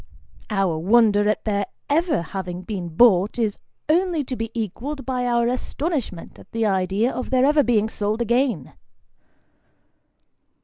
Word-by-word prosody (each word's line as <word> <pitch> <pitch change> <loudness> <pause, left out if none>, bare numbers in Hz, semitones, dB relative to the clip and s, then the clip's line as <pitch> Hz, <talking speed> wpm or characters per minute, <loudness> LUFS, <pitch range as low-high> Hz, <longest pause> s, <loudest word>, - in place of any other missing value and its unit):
Our 195 -6 0
wonder 205 +2 +4
at 215 - -1
their 200 -2 0 0.2
ever 310 - +1
having 180 0 -6
been 185 -3 -5
bought, 195 +3 +4
is 220 -4 -1 0.3
only 335 0 +2
to 255 -1 -5
be 225 -1 -4
equalled 245 +7 -4
by 250 -2 -1
our 235 -1 +2
astonishment 255 - -3
at - - -17
the 225 0 0
idea 195 +4 +1
of 255 - -5
their 260 0 +3
ever 295 +1 +4
being 225 -5 +2
sold 215 0 -2
again. 235 - 0
225 Hz, 140 wpm, -22 LUFS, 195-255 Hz, 0.3 s, wonder